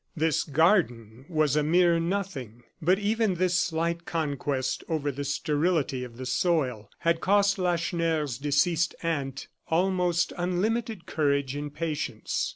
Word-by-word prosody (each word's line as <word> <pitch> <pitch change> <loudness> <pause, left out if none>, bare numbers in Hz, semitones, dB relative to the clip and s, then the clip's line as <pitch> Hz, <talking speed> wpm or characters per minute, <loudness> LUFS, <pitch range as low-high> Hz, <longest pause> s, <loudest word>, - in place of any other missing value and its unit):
This 160 -1 +2
garden 135 - +1
was 155 -4 +2
a 150 - +3
mere 170 +2 +4
nothing, 165 - -3 0.2
but 180 +4 +3
even 210 -1 +1
this 180 0 +1
slight 170 0 -1
conquest 140 -5 -2
over 150 -3 0
the 140 +2 -5
sterility 145 -1 0
of 120 -2 -10
the 130 - -6
soil 130 - 0
had 170 0 +1
cost 200 0 +3
Lacheneur's 165 -6 0
deceased 150 +4 +1
aunt 140 -5 -2 0.2
almost 175 0 +1
unlimited 210 +3 -1
courage 140 -3 0
and 145 0 -4
patience. 150 -7 -2
160 Hz, 130 wpm, -27 LUFS, 140-175 Hz, 0.2 s, mere